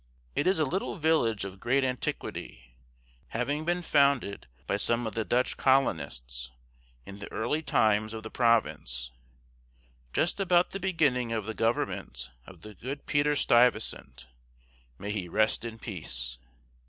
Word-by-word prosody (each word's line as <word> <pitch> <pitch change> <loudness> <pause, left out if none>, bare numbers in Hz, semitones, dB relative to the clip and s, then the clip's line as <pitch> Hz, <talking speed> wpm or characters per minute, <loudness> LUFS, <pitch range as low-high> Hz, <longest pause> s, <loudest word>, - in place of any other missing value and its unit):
It - - +1
is 190 - +4
a 155 - +2
little 190 +7 -2
village 150 - +2
of 95 0 -8
great 135 +5 +2
antiquity, 60 - -4 0.5
having 145 +7 -2
been 175 +1 0
founded 140 - +2 0.2
by 100 - 0
some 115 +3 +1
of 110 - -3
the 115 - -1
Dutch 125 +3 +1
colonists, 60 - +1 0.6
in 100 +1 -10
the 100 - -8
early 120 +8 -1
times 110 -6 +2
of 110 - -6
the 110 - -7
province, 75 - +1 1.0
just 170 - +1
about 180 -2 +3
the 195 - -4
beginning 150 -11 +1
of 110 -3 -1
the 110 - -3
government 65 - -2 0.2
of 90 -3 -13
the 105 +3 -10
good 135 +8 -6
Peter 145 0 +2
Stuyvesant 115 - +2 0.7
(may 100 +2 -4
he 95 -4 -3
rest 110 +5 +2
in 115 -1 -6
peace!) 60 - -2
115 Hz, 145 wpm, -29 LUFS, 100-140 Hz, 1.0 s, is